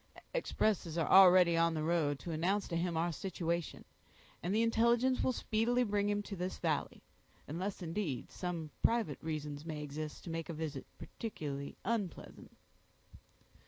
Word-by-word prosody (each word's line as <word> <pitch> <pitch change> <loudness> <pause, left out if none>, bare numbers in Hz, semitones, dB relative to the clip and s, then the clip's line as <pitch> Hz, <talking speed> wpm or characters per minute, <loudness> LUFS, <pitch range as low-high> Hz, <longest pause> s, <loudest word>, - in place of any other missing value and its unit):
"Expresses 210 - 0
are 165 - +1
already 180 -2 +8
on 165 0 +3
the 155 - -1
road 155 -3 +1
to 170 - -6
announce 185 +6 0
to 170 - -3
him 170 0 0
our 170 +2 +1
situation, 170 -2 -3 0.6
and 175 - -2
the 220 +3 +3
intelligence 235 +3 +3
will - - +2
speedily 240 +1 +1
bring 205 -2 +1
him 205 0 0
to 205 - -6
this 180 +1 -3
valley; - - -2 0.4
unless, 185 +5 -4
indeed, 165 - -3
some 170 -4 -4
private 225 - +1
reasons 150 -2 -4
may 155 -2 -5
exist 150 +1 -6
to 170 - -6
make 165 0 -4
a - - -3
visit 155 -3 -5
particularly 145 -10 -6
unpleasant." 210 -7 -4
170 Hz, 155 wpm, -34 LUFS, 155-205 Hz, 0.6 s, already